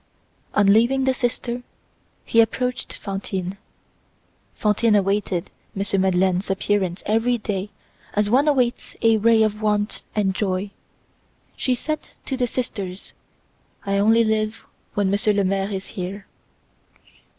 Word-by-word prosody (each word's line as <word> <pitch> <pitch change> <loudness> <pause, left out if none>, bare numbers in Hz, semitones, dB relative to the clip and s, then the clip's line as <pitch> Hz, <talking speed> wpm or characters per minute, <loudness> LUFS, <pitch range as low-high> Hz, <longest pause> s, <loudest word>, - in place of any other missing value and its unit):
On 205 - +4
leaving 235 +7 +4
the 265 0 +3
sister, 245 -1 -2 0.6
he 230 - +5
approached 250 +2 -1
Fantine. 195 -1 -4 1.0
Fantine 215 +1 +2
awaited 195 -3 0 0.3
M. 195 -1 +1
Madeleine's 185 0 +2
appearance 195 -2 0
every 225 +3 +2
day 205 -2 -3 0.5
as 210 0 +2
one 260 +7 +3
awaits 250 -4 +1
a 225 -1 +5
ray 225 +1 +5
of 215 0 -1
warmth 210 0 0
and 200 -3 +1
joy. 190 0 -1 0.8
She 255 - +1
said 310 +5 -2 0.3
to 270 - -2
the 250 -1 0
sisters, 200 -7 -5 0.7
"I 200 0 +1
only 225 +3 +5
live 215 0 -1 0.3
when 200 -2 +1
Monsieur 210 +1 +2
le 200 -1 +2
Maire 195 +1 0
is 195 -2 -5
here." 195 +2 -5
210 Hz, 130 wpm, -23 LUFS, 195-230 Hz, 1.0 s, he